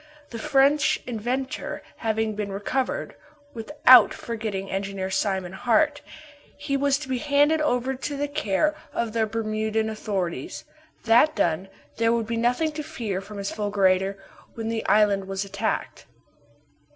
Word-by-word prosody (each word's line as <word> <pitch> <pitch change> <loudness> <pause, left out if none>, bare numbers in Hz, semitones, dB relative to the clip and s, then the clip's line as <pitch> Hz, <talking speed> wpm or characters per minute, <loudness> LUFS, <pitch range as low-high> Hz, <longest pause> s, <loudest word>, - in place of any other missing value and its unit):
The 230 - -6
French 280 +2 +3
inventor 250 +3 -3
having 220 -1 -1
been 205 -1 -4
recovered 215 +7 -2 0.4
without 255 0 +6
forgetting 215 -4 -4
Engineer 195 -1 -3
Simon 190 -2 -1
Hart 290 +7 +2 0.6
he 285 -1 -2
was 275 0 +2
to 295 -1 -8
be 260 -1 -1
handed 295 +2 +3
over 260 -3 0
to 275 +2 -4
the 290 +1 -1
care 285 +1 0 0.2
of 230 -2 -2
the 225 -1 +1
Bermudan 220 0 -1
authorities. 205 - -4 0.4
That 240 +7 +5
done, 175 +3 0 0.3
there 230 0 +3
would 230 -1 +1
be 230 +1 -3
nothing 250 +7 +1
to 305 0 -5
fear 230 -12 -4
from 205 +1 -10
his 200 0 -3
fulgurator 195 -2 +1 0.4
when 225 -1 -4
the 225 -1 -2
island 205 -2 +3
was 195 +1 -3
attacked. 200 +3 -3
225 Hz, 140 wpm, -25 LUFS, 200-270 Hz, 0.6 s, without